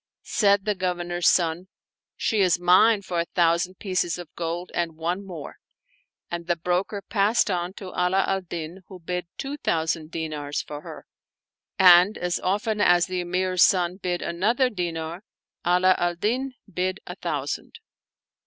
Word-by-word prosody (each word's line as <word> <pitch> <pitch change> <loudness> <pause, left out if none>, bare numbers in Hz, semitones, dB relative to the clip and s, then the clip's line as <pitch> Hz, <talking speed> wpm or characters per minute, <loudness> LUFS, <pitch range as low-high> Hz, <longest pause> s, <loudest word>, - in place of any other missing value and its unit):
Said 200 -3 +2
the 210 - +1
Governor's 175 -2 -1
son, 170 +1 +1 0.2
" - - -68
She 220 - 0
is 180 -2 +3
mine 195 +4 +5
for 180 -2 -2
a 170 - 0
thousand 175 +1 +2
pieces 185 -4 -1
of 175 -3 -10
gold 170 +1 -4
and 165 -2 -2
one 175 +4 -2
niore," 165 -6 -7 0.8
and 170 -1 -5
the 175 - +2
broker 180 +4 -2
passed 210 0 +2
on 175 0 -2
to 195 -2 -8
Ala 180 +2 +1
al 195 0 0
Din 170 0 -7
who 185 - -11
bid 180 +1 -4
two 280 +2 -4
thousand 160 - -1
dinars 150 -3 -4
for 150 0 -8
her; - - -10 0.7
and 185 +1 +7
as 180 0 -1
often 210 +3 -1
as 175 -3 +5
the 185 -1 -3
Emir's 185 +1 0
son 180 0 +4
bid 180 -2 -2
another 230 +9 +1
dinar, 170 -3 -4 0.5
Ala 180 +1 +5
al 175 0 0
Din 255 +8 -1
bid 185 +2 -2
a - - -6
thousand. - - -4
180 Hz, 160 wpm, -25 LUFS, 170-195 Hz, 0.8 s, and